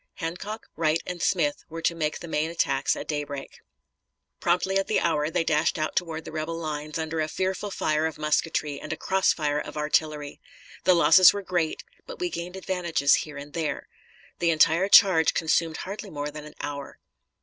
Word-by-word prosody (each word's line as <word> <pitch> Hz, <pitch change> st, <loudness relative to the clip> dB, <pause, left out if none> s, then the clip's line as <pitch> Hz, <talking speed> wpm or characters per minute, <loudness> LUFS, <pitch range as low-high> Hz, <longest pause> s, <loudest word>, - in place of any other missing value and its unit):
Hancock, 190 Hz, +7 st, -5 dB
Wright, 160 Hz, 0 st, +1 dB
and 180 Hz, -1 st, -5 dB
Smith 150 Hz, -6 st, +1 dB
were 165 Hz, 0 st, -7 dB
to 170 Hz, -, +2 dB
make 155 Hz, -2 st, -2 dB
the 170 Hz, -, -7 dB
main 160 Hz, 0 st, -1 dB
attacks 135 Hz, -5 st, +1 dB
at -, -, -7 dB
daybreak. 145 Hz, -2 st, -5 dB, 0.8 s
Promptly 185 Hz, +3 st, +1 dB
at 195 Hz, -, -2 dB
the 215 Hz, -, +2 dB
hour 155 Hz, -3 st, +1 dB
they 165 Hz, -, 0 dB
dashed 155 Hz, 0 st, +1 dB
out 155 Hz, 0 st, -2 dB
toward 165 Hz, -3 st, -2 dB
the -, -, -7 dB
rebel 155 Hz, +1 st, -3 dB
lines, 155 Hz, -2 st, -4 dB
under 160 Hz, 0 st, -3 dB
a 155 Hz, -, 0 dB
fearful 190 Hz, +5 st, -2 dB
fire 155 Hz, -4 st, 0 dB
of 160 Hz, -, -7 dB
musketry 150 Hz, -1 st, -1 dB
and -, -, -6 dB
a 160 Hz, -, -3 dB
cross 190 Hz, 0 st, +2 dB
fire 150 Hz, -2 st, -1 dB
of 150 Hz, -, -7 dB
artillery. 150 Hz, -1 st, -1 dB, 0.4 s
The 185 Hz, -, +6 dB
losses 180 Hz, +1 st, +7 dB
were 200 Hz, -1 st, -4 dB
great, 175 Hz, -4 st, -1 dB, 0.2 s
but -, -, -8 dB
we 355 Hz, -3 st, -2 dB
gained 175 Hz, -, -5 dB
advantages 175 Hz, -6 st, +1 dB
here 150 Hz, -2 st, -1 dB
and 145 Hz, +1 st, -9 dB
there. 160 Hz, -3 st, -3 dB, 0.5 s
The 170 Hz, -, +2 dB
entire 165 Hz, +4 st, +4 dB
charge 180 Hz, -6 st, +6 dB
consumed 160 Hz, 0 st, +1 dB
hardly 200 Hz, +2 st, -6 dB
more 145 Hz, -3 st, -4 dB
than 150 Hz, 0 st, -9 dB
an 150 Hz, -, -12 dB
hour. 140 Hz, -1 st, -6 dB
160 Hz, 190 wpm, -26 LUFS, 150-180 Hz, 0.8 s, losses